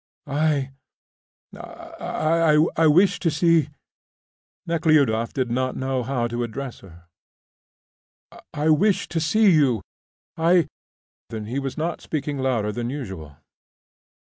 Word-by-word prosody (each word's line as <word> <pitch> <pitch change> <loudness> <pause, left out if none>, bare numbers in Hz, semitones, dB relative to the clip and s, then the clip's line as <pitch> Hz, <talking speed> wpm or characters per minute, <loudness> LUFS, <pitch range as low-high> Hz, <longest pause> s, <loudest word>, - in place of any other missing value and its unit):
"I, 145 -2 0 0.8
I 160 -1 -1 0.2
I 160 0 +4
wished 180 +5 +4
to 170 - +2
see 160 0 +2 0.5
" - - -84
Nekhludoff 150 -9 +2
did 130 -3 -2
not 130 +1 -1
know 130 -1 -2
how 125 -1 -1
to 120 +1 -4
address 125 +2 -6
her. 85 -3 -16 1.5
"I 150 +1 -1
wished 195 +6 +2
to 165 - 0
see 200 +6 +3
you 135 - +2 0.5
I 165 -1 +3 0.3
" - - -82
He 110 +4 -4
was 135 +1 -5
not 165 +2 -3
speaking 145 -2 -4
louder 120 -6 0
than 120 +2 -4
usual. 95 - -7
140 Hz, 120 wpm, -23 LUFS, 120-160 Hz, 1.5 s, I